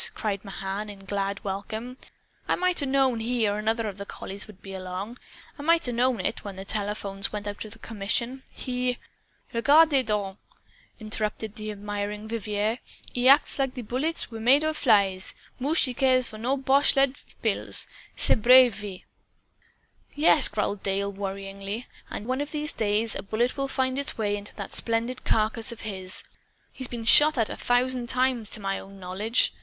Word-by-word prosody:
cried 200 -3 -2
Mahan 195 +1 -5
in 195 -1 -11
glad 200 0 -2
welcome. 215 +5 -5 0.5
"I - - +2
might 365 -2 +2
'a' 280 - -1
known 265 -3 +2
he 230 -1 0
or 205 +1 -1
another 225 +1 0
of 200 -1 -6
the 200 - -5
collies 200 +3 -6
would 210 -3 -14
be 195 - -10
along. 190 +5 -6 0.4
I - - -5
might 330 0 +3
'a' - - -1
known 240 -2 +1
it, - - -2
when 200 -3 -7
the 190 +1 -8
telephones 200 -1 -1
went 210 -1 -5
out 205 0 -5
of 220 +1 -11
commission. 230 +5 -2
He 250 -1 -2 0.3
" - - -34
"Regardez 285 +3 +5
donc!" 205 -2 -2 0.6
interrupted 215 -1 -2
the 215 0 -6
admiring 205 0 -4
Vivier. 215 +1 -2 0.3
"He 250 +1 +3
acts 280 +1 +5
like 270 -1 0
bullets 280 +5 0
was 225 -1 -7
made 265 +6 +5
of 310 0 0
flies! 200 -8 +2 0.2
Mooch 290 +6 +2
he 255 - 0
care 255 0 +3
for 215 -3 -8 0.2
boche 275 +2 +3
lead 275 0 +3 0.2
pills, - - +2 0.3
ce - - +2
brave 250 +1 +7
vieux!" 205 -3 -7 1.1
"Yes," 295 -1 +6
growled 205 -1 -2
Dale 200 +1 -1
worriedly; 195 +2 -5 0.2
"and 210 - -6
one 255 +3 -1
of 290 - -4
these 300 +1 -1
days 215 +1 0
a - - -4
bullet 220 +5 -1
will 275 -1 -1
find 260 0 0
its 280 - -2
way 205 -2 0
into 205 0 -8
that 200 - -7
splendid 230 +2 -2
carcass 220 +1 +1
of 235 - -9
his. 190 -3 0 0.5
He's 260 - -3
been 235 -2 -6
shot 300 +5 +7
at, 225 -2 +2
a - - -4
thousand 245 0 +1
times, 250 -4 +1
to - - 0
my 195 -1 -2
own 195 0 -12
knowledge. 195 +6 +1
220 Hz, 180 wpm, -26 LUFS, 200-255 Hz, 1.1 s, brave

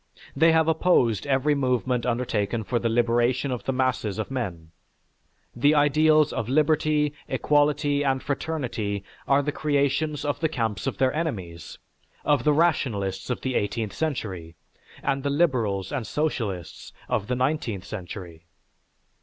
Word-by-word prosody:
They 160 +4 +5
have 160 0 +3
opposed 155 - +2
every 140 +2 +2
movement 125 -3 0
undertaken 115 -2 -1
for 120 +3 -1
the 115 - 0
liberation 120 +3 +1
of 125 - -4
the - - 0
masses 130 -6 -1
of 110 +4 -4
men; 90 -11 -4 0.8
the 145 +5 +3
ideals 155 +1 +4
of 110 - -3
liberty, 150 +1 +2
equality 145 -1 +2
and 135 -2 0
fraternity 125 -9 -3 0.2
are 140 +1 +3
the 145 - -1
creations 145 0 0
of 145 - -1
the 160 - +1
camps 115 -5 -2
of 135 - -2
their 130 -1 +2
enemies, 95 - -4 0.5
of 145 -1 +2
the 150 - +5
rationalists 115 - 0
of 125 - -2
the 130 - -2
eighteenth 105 0 -1
century, 95 - -4 0.5
and 135 -1 0
the 140 - -1
liberals 120 - +1
and 130 -6 -3
socialists 105 - -3 0.2
of 105 - -1
the 125 - 0
nineteenth 125 -7 -1
century. 90 -4 -8
130 Hz, 145 wpm, -25 LUFS, 110-145 Hz, 0.8 s, They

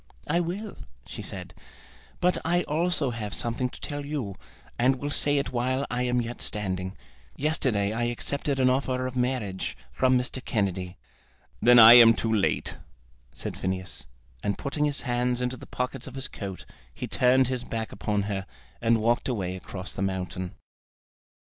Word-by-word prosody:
"I 170 - +2
will," 190 +5 -4 0.3
she - - -7
said; - - -6 0.7
"but 180 +1 +2
I 175 +2 +2
also 160 -3 +1
have 105 -3 -4
something 120 +2 -1
to - - -12
tell 145 -1 -4
you, 140 -9 -3 0.5
and 130 +2 +4
will 145 +2 -4
say 145 0 +3
it 140 - -1
while 130 +2 0
I 120 0 -1
am 125 0 +2
yet 120 +1 -6
standing. 95 -2 -1 0.4
Yesterday 125 -9 +1
I 120 +1 0
accepted 135 +3 -2
an 130 - +4
offer 130 0 +1
of 130 0 -4
marriage 125 -7 -1
from 130 0 +3
Mr. 125 +1 -2
Kennedy." 95 -4 -2 0.6
"Then 120 0 +7
I 115 0 +11
am 115 -2 +9
too 110 0 -1
late," 105 -3 0 0.5
said - - -6
Phineas, 95 -6 -4 0.3
and 100 - -1
putting 150 +1 -1
his 145 -1 -1
hands 125 0 0
into 125 0 -1
the - - -12
pockets 125 0 -3
of 130 - -9
his 135 0 -2
coat, 95 -3 -7 0.3
he - - -6
turned 130 +1 +4
his 130 -1 -2
back 115 -2 -4
upon 100 0 -1
her, 100 -2 -3 0.3
and 115 -1 +3
walked 120 +4 +1
away 95 -7 -2
across 95 0 -6
the - - -5
mountain. 95 -1 -3
125 Hz, 165 wpm, -27 LUFS, 100-135 Hz, 0.7 s, I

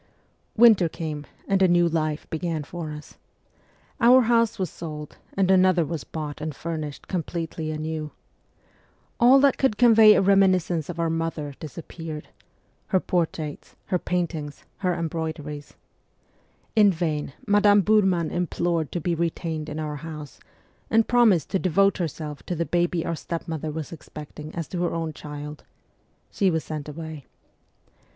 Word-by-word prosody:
Winter 215 -7 +6
came, 155 -3 -5 0.2
and 195 -1 +2
a 190 - +6
new 175 -1 +4
life 155 -2 -1
began 160 -1 -2
for 165 +1 -6
us. 150 0 -10 0.8
Our 250 +2 +7
house 230 -1 +2
was 185 -2 -2
sold' 150 -3 -8 0.2
and 190 -1 +3
another 185 -3 +4
was 160 -4 -4
bought 150 +4 -6
and 155 -2 -4
furnished 155 -3 -5
completely 165 -3 -3
anew. 155 0 -3 1.1
All 250 +3 +7
that 280 -2 +3
could 265 -6 +2
convey 225 -3 +8
a - - +4
reminiscence 185 -4 +3
of 170 -1 -5
our 165 -1 +1
mother 165 -3 -3
disappeared 160 0 -8 0.6
her 190 - +2
portraits, 160 -4 -3 0.2
her 180 - +3
paintings, 165 -5 -3
her 180 -3 0
embroideries. 160 -3 -5 1.0
In 210 -2 +6
vain 155 -5 -2
Madame 205 0 +5
Burman 190 -5 +2
implored 170 -2 -1
to 175 - -1
be 170 +2 -1
retained 165 -2 -2
in 150 +1 -5
our 150 -1 -3
house, 150 -2 -8 0.5
and 225 0 +3
promised 230 -9 +4
to 190 - +1
devote 195 +3 +2
herself 155 -3 -4
to 180 - -2
the 170 +1 -1
baby 175 +2 0
our 170 - -1
stepmother 160 -1 -4
was 155 0 -5
expecting 150 -1 -9
as 165 -2 -3
to 175 - -3
her 175 -1 0
own 165 -1 -3
child: 150 0 -8 0.7
she 195 -3 +2
was 160 -2 0
sent 150 -1 -6
away. 155 -1 -8
165 Hz, 145 wpm, -25 LUFS, 155-185 Hz, 1.1 s, convey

